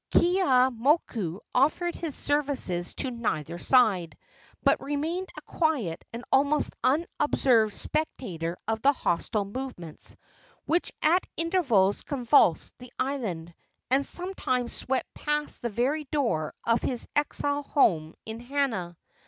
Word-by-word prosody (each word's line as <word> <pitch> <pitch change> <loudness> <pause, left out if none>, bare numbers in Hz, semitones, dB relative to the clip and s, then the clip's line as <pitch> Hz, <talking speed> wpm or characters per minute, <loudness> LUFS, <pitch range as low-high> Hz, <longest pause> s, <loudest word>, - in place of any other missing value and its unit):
Keeaumoku 255 - +2
offered 315 +7 +2
his 320 -5 -4
services 275 -12 -1
to 265 - -2
neither 170 - -3
side, 200 -10 +3 0.5
but - - +3
remained 315 +6 -2
a - - -8
quiet 280 - -1
and 235 +1 -7
almost 285 +2 +3
unobserved 255 -6 +2
spectator 180 - -3
of 225 0 -1
the 280 +3 +5
hostile 205 -2 0
movements 200 - -6 0.5
which 340 +3 +1
at 345 +4 +3
intervals 275 - +2
convulsed 250 - +3
the 250 -1 -12
island, 200 -12 -3 0.4
and 270 +2 +4
sometimes 275 -9 -2
swept 265 0 -2
past 295 0 -2
the 235 - -1
very 265 +8 0
door 235 - -1
of 230 0 +2
his 245 -3 -1
exile 290 0 0
home 165 - +2
in 220 +1 -6
Hana. 240 -10 -2
255 Hz, 120 wpm, -27 LUFS, 205-295 Hz, 0.5 s, the